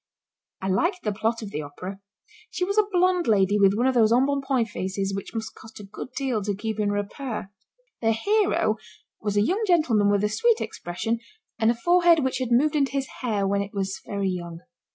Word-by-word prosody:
I - - -1
liked 345 - 0
the 210 - 0
plot 225 +3 -1
of 205 - -7
the 150 - -3
Opera. 180 +7 -8 0.5
She 360 - -2
was 400 +3 +1
a 420 - +3
blonde 360 -1 +2
lady 205 -1 +3
with 195 0 +5
one 240 +4 +1
of 265 - +3
those 225 -3 +4
embonpoint 270 -1 +2
faces 195 0 -3
which 195 +3 -6
must 220 0 -4
cost 220 0 -13
a - - -9
good 210 +5 -8
deal 260 -6 -1
to 205 0 -2
keep 220 +1 -4
in 205 -1 +1
repair. 205 +1 -4 0.5
The 225 -1 +3
hero 380 - +1 0.4
was 205 -1 -1
a 205 - +4
young 380 - 0
gentleman 250 - +3
with 205 0 +2
a 210 - +2
sweet 455 - +2
expression 225 +7 -3 0.4
and 220 0 +3
a 235 - +2
forehead 345 +3 +4
which 260 0 -1
had 255 -2 -2
moved 285 +6 +3
into 275 -2 +1
his 275 -1 -1
hair 210 -6 0
when 200 +1 +1
it 200 +1 -7
was 195 -1 -3
very 200 -2 -2
young. 170 -2 -6
220 Hz, 210 wpm, -25 LUFS, 200-275 Hz, 0.5 s, with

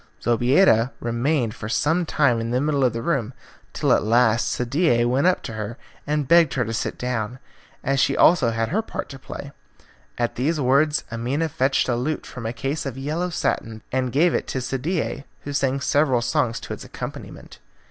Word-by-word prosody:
Zobeida 120 - +3
remained 120 0 0
for 105 - -7
some 160 +8 +1
time 125 -8 +2
in 115 - -3
the 125 +1 +1
middle 145 -1 +1
of 125 - +3
the 115 0 -5
room, 130 -6 -1 0.4
till - - +2
at - - +3
last 115 +1 +3
Sadie 125 -1 +1
went 130 +7 +2
up 185 - +2
to 115 - -6
her 110 +2 -5 0.3
and 150 -2 0
begged 170 -1 +5
her 125 -3 +1
to 115 - -4
sit 115 - -3
down, 125 -1 -3 0.5
as 135 +1 +1
she 135 +1 +2
also 160 -9 +5
had 115 0 -1
her 205 +9 +1
part 225 - -6
to 135 - -9
play. 140 +1 -8 0.7
At 120 -1 -1
these 150 +6 0
words 145 +3 +2
Amina 130 +8 -1
fetched 135 -3 +1
a 120 - +1
lute 145 +6 -2
from 120 -3 -6
a - - -2
case 140 +4 -3
of 135 -1 -6
yellow 155 +6 -2
satin 110 -9 -2
and 130 -1 0
gave 160 +6 +3
it - - -1
to 130 - -2
Sadie, 140 +4 -2 0.2
who 145 - -6
sang 140 -1 +1
several 135 -4 +2
songs 120 -1 0
to - - -6
its - - -8
accompaniment. - - -9
130 Hz, 195 wpm, -23 LUFS, 120-150 Hz, 0.7 s, begged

